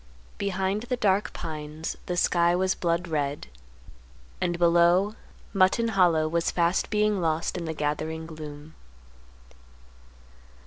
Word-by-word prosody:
Behind 195 +1 -1
the 250 - 0
dark 200 -2 +1
pines 155 0 -6
the 180 - -2
sky 175 -1 +3
was 185 +1 +1
blood 170 0 -1
red, 145 -3 -2 1.0
and 175 -1 0
below, 175 +4 +4 0.4
Mutton 200 +4 +3
Hollow 175 -6 +3
was 170 +1 0
fast 170 +1 +1
being 210 -2 +1
lost 160 0 0
in 175 -2 -4
the 160 - -3
gathering 155 +2 -2
gloom. 155 -1 -9
170 Hz, 120 wpm, -26 LUFS, 160-190 Hz, 1.0 s, below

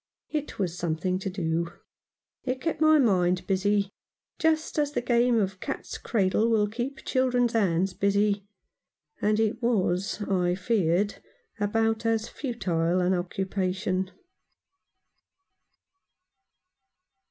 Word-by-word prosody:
It 300 -1 -3
was 180 -4 -1
something 175 +2 -1
to 195 - -3
do. 170 -2 -2 0.7
It 255 0 -2
kept 325 +2 -2
my 310 0 +6
mind 185 -8 +2
busy, 200 +1 +1 0.5
just 315 -1 +1
as 290 -1 0
the - - 0
game 240 -1 +3
of 190 -2 -1
cat's - - -5
cradle 210 +1 +1
will 215 -2 +3
keep 250 +5 -5
children's 250 -2 +2
hands 190 -4 +2
busy, 200 +1 +1 0.7
and 210 +1 +2
it 225 +2 0
was, 200 -4 0
I 180 -3 +1
feared, 195 -1 +1 0.4
about 225 +2 +1
as 225 0 +1
futile 180 - -1
an 180 +1 +2
occupation. 185 +1 -1
200 Hz, 110 wpm, -27 LUFS, 185-235 Hz, 0.7 s, my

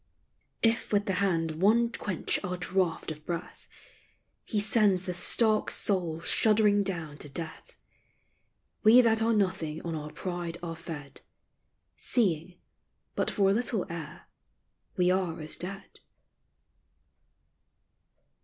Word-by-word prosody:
If 230 0 +1
with 205 -1 +2
the 195 - -1
hand 165 -4 0
one 230 +4 +4
quench 195 -4 -2
our 180 -2 -3
draught 180 -3 -1
of 155 0 -9
breath, 170 +2 -6 0.8
He 215 - -2
sends 205 -3 +3
the 185 -1 -3
stark 215 +5 +3
soul 175 -5 0
shuddering 210 +1 +3
down 165 -7 -4
to 145 - -6
death. 165 +3 -6 1.1
We 230 +4 +8
that 225 -2 +2
are 225 +1 +2
nothing 185 -7 0
on 170 - -4
our 150 -1 -5
pride 175 -2 -5
are 165 -1 -4
fed, 150 -4 -8 0.8
Seeing, 180 -6 +1 0.6
but - - 0
for 195 -2 +2
a - - +3
little 230 -2 -1
air, 160 -2 -8 0.7
we 180 0 +3
are 185 -3 -1
as 155 0 -1
dead. 195 +3 -6
185 Hz, 125 wpm, -29 LUFS, 165-210 Hz, 1.1 s, We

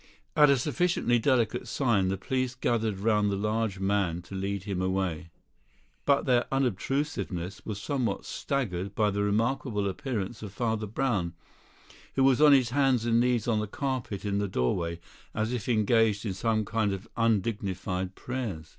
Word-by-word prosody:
At 150 -1 +7
a 140 - +5
sufficiently 140 -2 +1
delicate 125 -1 +1
sign, 115 -9 +1
the 95 +1 -1
police 130 +4 -2
gathered 115 -5 0
round 105 0 +2
the 100 - 0
large 105 0 -1
man 95 -3 0
to 90 - -12
lead 100 0 -3
him 100 -3 -3
away; 95 -3 -1 0.8
but 140 -1 +3
their 125 -2 +3
unobtrusiveness 125 - -2
was 105 -2 -3
somewhat 120 -5 -2
staggered 100 -8 -3
by 105 -1 +2
the 100 +1 -1
remarkable 105 0 0
appearance 105 +1 -3
of 105 -3 -7
Father 110 -2 -1
Brown, 100 -7 -1 0.8
who 135 - +3
was 135 +1 +4
on 150 -1 +8
his 130 -4 +4
hands 130 -4 +2
and 115 0 +3
knees 120 -2 +1
on 110 -3 +2
the 105 - -2
carpet 125 -5 -3
in 100 0 0
the 100 - 0
doorway, 85 +3 -1 0.4
as 110 +3 -1
if 125 -1 -3
engaged 110 -1 +3
in 100 - -1
some 110 +2 0
kind 110 -1 0
of 95 +3 -6
undignified 95 -4 -1
prayers. 110 -12 -5
110 Hz, 165 wpm, -28 LUFS, 95-125 Hz, 0.8 s, on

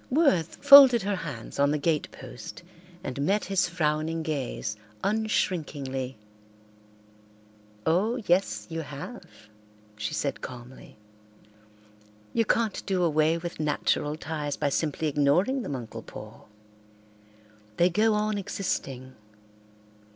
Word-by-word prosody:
Worth 255 - +2
folded 275 -5 +10
her 200 0 -1
hands 135 -10 -7
on 140 0 +4
the 150 - +1
gatepost 145 -3 -4 0.4
and 130 +2 -4
met 200 +8 +1
his 195 -2 +1
frowning 160 -1 -1
gaze 135 -8 -3 0.3
unshrinkingly. 145 - -1 1.7
"Oh, 195 +9 +2
yes, 180 +3 +1
you 165 -1 -4
have," 150 - -8 0.7
she 105 0 -3
said 140 - -2
calmly. 125 -1 -10 1.4
"You 230 - +2
can't 225 -1 0
do 185 -2 +1
away 155 0 +3
with 170 -1 -6
natural 150 0 0
ties 150 -2 -4
by 145 - 0
simply 155 +2 -1
ignoring 150 - +2
them, 145 - -4
Uncle 120 -3 -7
Paul. - - -11 1.3
They 175 +1 +4
go 215 +3 +3
on 210 0 0
existing. 135 -10 -4
160 Hz, 110 wpm, -27 LUFS, 140-195 Hz, 1.7 s, folded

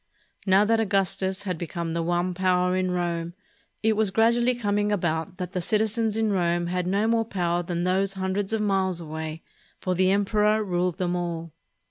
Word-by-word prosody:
Now 195 +2 +5
that 225 +1 +2
Augustus 195 -2 0
had 180 -5 -3
become 170 -1 -4
the 170 - -1
one 175 +2 0
power 180 0 +1
in 185 0 0
Rome, 170 -1 -2 0.5
it 220 0 +3
was 215 -1 +2
gradually 235 +4 +3
coming 205 -2 0
about 170 -1 -1
that 180 -2 -5
the 185 -2 -2
citizens 220 +3 +1
in 220 -2 +1
Rome 175 -2 +1
had 180 +1 -2
no 200 +4 +1
more 230 0 +2
power 175 -5 -1
than 175 0 -3
those 190 +2 +1
hundreds 190 +1 -2
of 220 -1 0
miles 190 -3 +1
away, 160 0 -6 0.4
for 185 - -1
the 185 +1 +2
emperor 210 +2 +2
ruled 180 -2 -1
them 180 -2 -1
all. 170 -2 -4
185 Hz, 180 wpm, -25 LUFS, 175-205 Hz, 0.5 s, Now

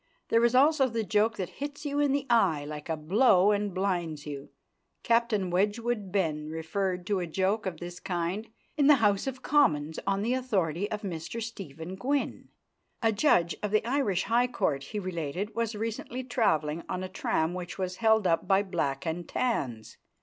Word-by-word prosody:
There 230 +1 +4
is 235 +1 +3
also 275 0 +5
the 225 -1 -1
joke 215 +2 +1
that 185 -3 -3
hits 290 +1 -5
you 290 0 -1
in 290 -1 +3
the 280 0 0
eye 190 -11 +3
like 150 +1 -7
a 160 - -1
blow 190 +4 +4
and 205 0 0
blinds 175 -5 -2
you. 140 -2 -7 0.5
Captain 230 -6 +2
Wedgwood 210 +2 0
Benn 155 -6 -1
referred 180 +3 -2
to 200 -1 0
a 175 - -3
joke 195 +5 0
of 170 -4 -4
this 175 0 -7
kind 180 +4 -2 0.3
in 285 -2 +3
the 295 - +8
House 210 -2 +2
of 260 -1 -5
Commons 160 - +2
on 195 0 +1
the 235 +3 +1
authority 205 -8 0
of 215 -1 -4
Mr 175 +3 -5
Stephen 185 -7 -7
Gwynn. 275 +8 -2 0.5
A 225 - +4
judge 200 - +3
of 210 - -1
the 215 +2 +1
Irish 235 -8 +1
High 240 +2 +2
Court, 140 - -1
he 215 - -6
related, 185 +1 -3
was 230 -1 -1
recently 230 +3 -4
travelling 170 -11 +1
on 185 - -2
a - - -3
tram 160 -2 -1
which 180 -1 -6
was 185 -1 -3
held 220 -2 +3
up 165 -2 +1
by 195 0 +4
Black 140 -8 -2
and 170 +1 -3
Tans. 130 - -2
195 Hz, 185 wpm, -29 LUFS, 170-230 Hz, 0.5 s, the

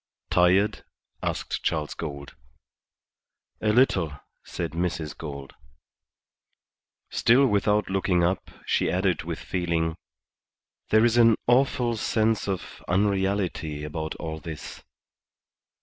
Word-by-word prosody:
"Tired?" 95 +4 +3 0.4
asked - - -3
Charles 75 -2 -1
Gould. 70 -3 -7 1.3
"A 110 - +2
little," 90 - +2 0.2
said - - -4
Mrs. 85 -2 -2
Gould. 70 -3 -8 1.6
Still 125 +4 +4
without 105 -2 +2
looking 95 -2 +1
up, 90 +2 0 0.2
she - - +1
added 95 0 +1
with 85 0 -5
feeling, 85 -3 -1 0.9
"There 110 +1 +5
is 120 0 +3
an 115 -2 +6
awful 120 -1 +2
sense 110 -1 +1
of 95 -3 -5
unreality 95 -5 0
about 80 +1 -4
all 80 -1 -5
this." 80 -1 -8
90 Hz, 100 wpm, -26 LUFS, 80-105 Hz, 1.6 s, an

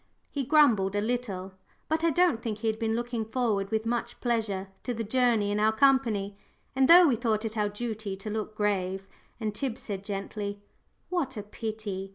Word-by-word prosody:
He 280 - -2
grumbled 235 -10 +4
a - - +2
little, 210 -5 -2 0.4
but 315 +1 0
I 335 - +4
don't 340 -7 +3
think 225 -3 -3
he 225 - -3
had 220 0 0
been 225 -1 0
looking 240 -1 -2
forward 220 -4 -1
with 220 +1 -1
much 235 0 -2
pleasure 215 -6 -1
to 245 - -3
the 225 - -2
journey 225 -2 +2
in 205 - 0
our 215 +1 +4
company, 220 -5 +2 0.4
and 265 0 +4
though 350 +3 +9
we 265 - +3
thought 225 -1 0
it 220 0 -4
our 210 -1 +1
duty 215 -2 -4
to 200 +3 -7
look 215 0 -4
grave, 195 -2 -1 0.3
and 215 -2 -2
Tib 250 +1 -3
said 200 -6 -6
gently, 200 0 -4 0.5
"What 285 -9 -2
a 210 - -4
pity!" 210 -2 -5
220 Hz, 195 wpm, -28 LUFS, 205-245 Hz, 0.5 s, though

